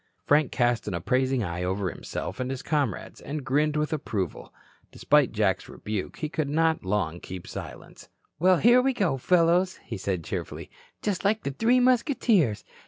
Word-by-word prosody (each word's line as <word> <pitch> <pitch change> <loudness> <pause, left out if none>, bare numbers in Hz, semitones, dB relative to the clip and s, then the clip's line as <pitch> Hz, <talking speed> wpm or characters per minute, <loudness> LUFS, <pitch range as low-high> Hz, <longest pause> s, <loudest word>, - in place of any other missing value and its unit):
Frank 145 -1 +3
cast 120 -2 +1
an 100 - -2
appraising 130 +7 +1
eye 85 -2 -4
over 95 +2 -1
himself - - -6
and 130 0 -2
his 135 -1 -4
comrades, 145 - -2
and 145 -1 -5
grinned 150 +3 +1
with 150 +1 -1
approval. 105 - -3 0.4
Despite 150 -3 +3
Jack's 105 -4 0
rebuke, 105 -3 -5
he 155 - -3
could 150 -1 -2
not 160 +2 +1
long 95 -3 -1
keep 90 -1 -8
silence. - - -9 0.3
"Well, 185 +2 +5
here 240 +6 +6
we 265 +1 +1
go, 185 - 0
fellows," 180 +4 +3
he - - -5
said 95 -3 -2
cheerfully, - - -6 0.3
"just 200 -3 -1
like 215 +2 +1
the 140 - -2
Three 230 - +3
Musketeers. 240 - +2
145 Hz, 170 wpm, -26 LUFS, -, 0.4 s, here